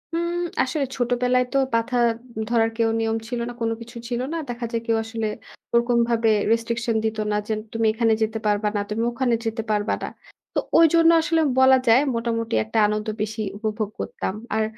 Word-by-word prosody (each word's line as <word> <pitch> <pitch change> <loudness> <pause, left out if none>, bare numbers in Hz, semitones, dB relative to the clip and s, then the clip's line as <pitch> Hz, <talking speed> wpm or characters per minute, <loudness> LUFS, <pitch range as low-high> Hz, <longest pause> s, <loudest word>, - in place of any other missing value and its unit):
উম 340 +1 -1 0.3
আসলে 275 +2 -1
ছোটবেলায় 250 0 +2
তো - - +3 0.2
পাথা 230 +2 0 0.5
ধরার 225 -1 +3
কেউ 225 -1 +2
নিয়ম 225 0 0
ছিল 240 0 -3
না, - - -6
কোন 225 0 +1
কিছু 235 +1 -10
ছিল 240 0 -1
না। - - -1
দেখা 240 0 -4
যায় 230 -1 -1
কেউ 225 -1 +2
আসলে 225 -1 -3 0.5
ওরকমভাবে 235 -1 +2 0.2
রেস্ট্রিকশন 230 0 0
দিত 220 0 -1
না - - +1
যে 220 - 0 0.2
তুমি 225 0 0
এখানে 225 0 +2
যেতে 220 0 0
পারবা 210 0 +1
না। - - +1
তুমি 220 +2 -1
ওখানে 245 0 0
যেতে 225 0 -2
পারবা 210 0 +1
না। - - -2 0.5
তো - - +1 0.2
ঐজন্য 330 0 +6
আসলে 325 0 +1 0.2
বলা 260 0 +7
যায় 230 +3 +7 0.2
মোটামুটি 230 0 -1
একটা 220 +1 -4
আনন্দ 210 +1 -2
বেশি 215 +1 -3 0.2
উপভোগ 215 -1 -2
করতাম। - - -3 0.2
আর 220 - +2
230 Hz, 185 wpm, -23 LUFS, 220-245 Hz, 0.5 s, বলা